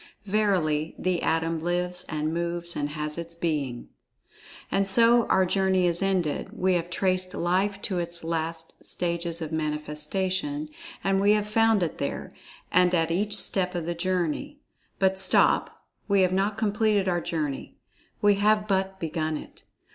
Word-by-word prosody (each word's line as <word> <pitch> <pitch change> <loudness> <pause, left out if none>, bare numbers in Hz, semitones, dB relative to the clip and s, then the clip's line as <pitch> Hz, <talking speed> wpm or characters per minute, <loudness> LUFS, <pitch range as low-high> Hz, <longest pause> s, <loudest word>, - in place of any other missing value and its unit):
Verily, 185 -7 +1
the 185 -2 0
Atom 165 0 0
lives 180 +1 -2
and 155 +1 -2
moves 170 0 -2
and 145 0 -2
has 150 +1 -4
its 170 0 -7
being. 150 -8 -2 0.8
And, 195 0 +2
so 230 +3 +5
our 190 0 +3
journey 190 0 +2
is 175 0 +2
ended—we 185 0 0
have 175 -1 -1
traced 185 0 0
Life 190 +4 0
to 185 -3 -1
its 170 0 -3
last 165 0 -4
stages 170 -1 -2
of 155 - -6
manifestations—and 190 - -2
we 205 +1 +5
have 210 -1 0
found 225 -2 +3
it 165 - -3
there, 140 - -4 0.4
and 180 0 +4
at 165 -1 +1
each 205 +4 0
step 185 -2 0
of 170 -2 -2
the 175 - -1
journey. 180 - -2 0.4
But, 190 0 +2
stop, 190 -1 +2 0.2
we 200 -2 +3
have 185 -1 +2
not 200 +2 0
completed 210 -2 +1
our 175 -2 +1
journey—we 160 +6 -2
have 210 +1 +3
but 190 -1 0
begun 155 -2 -2
it. - - -12
180 Hz, 145 wpm, -26 LUFS, 165-195 Hz, 0.8 s, so